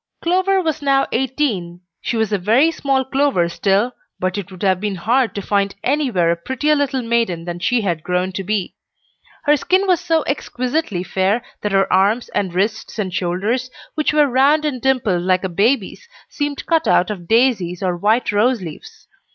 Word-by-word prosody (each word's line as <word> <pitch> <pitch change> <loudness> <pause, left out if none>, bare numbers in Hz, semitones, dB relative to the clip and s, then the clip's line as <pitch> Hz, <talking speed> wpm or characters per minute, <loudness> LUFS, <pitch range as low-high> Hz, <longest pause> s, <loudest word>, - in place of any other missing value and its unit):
Clover 375 +2 +2
was 310 -2 -2
now 275 -1 +2
eighteen. 230 -10 -1 0.2
She 235 - -2
was 220 -1 0
a 205 - +1
very 235 - +3
small 270 -4 0
Clover 265 -9 +1
still, 200 +7 +1 0.3
but 185 0 -1
it 200 -2 -5
would 185 +1 -10
have 190 -2 +2
been 210 -2 -2
hard 235 +7 +1
to 200 - -4
find 200 0 0
anywhere 250 - +1
a - - +1
prettier 260 - 0
little 275 -3 0
maiden 230 -8 0
than 175 0 -5
she 230 +6 +1
had 175 -6 -1
grown 180 +2 -1
to 195 +1 -4
be. 200 -1 -2 0.7
Her 295 0 +4
skin 370 +7 +1
was 365 -4 +2
so 325 -2 +1
exquisitely 255 - -2
fair 195 +5 0 0.2
that 210 - -2
her 195 0 +3
arms 205 +6 +2
and 190 -3 -1
wrists 210 +5 -2
and 190 -4 -3
shoulders, 200 +9 -1 0.2
which 305 -1 0
were 300 -1 +4
round 280 +4 +3
and 265 -5 -2
dimpled 240 -9 +1
like 185 +1 +1
a 190 - -1
baby's, 230 - 0 0.2
seemed 290 -1 -4
cut 325 -1 +1
out 180 +4 +3
of 175 -5 -7
daisies 220 -7 +2
or 180 -2 0
white 215 +7 +1
rose 230 +4 +2
leaves. 165 -5 -10
220 Hz, 185 wpm, -19 LUFS, 185-275 Hz, 0.7 s, Her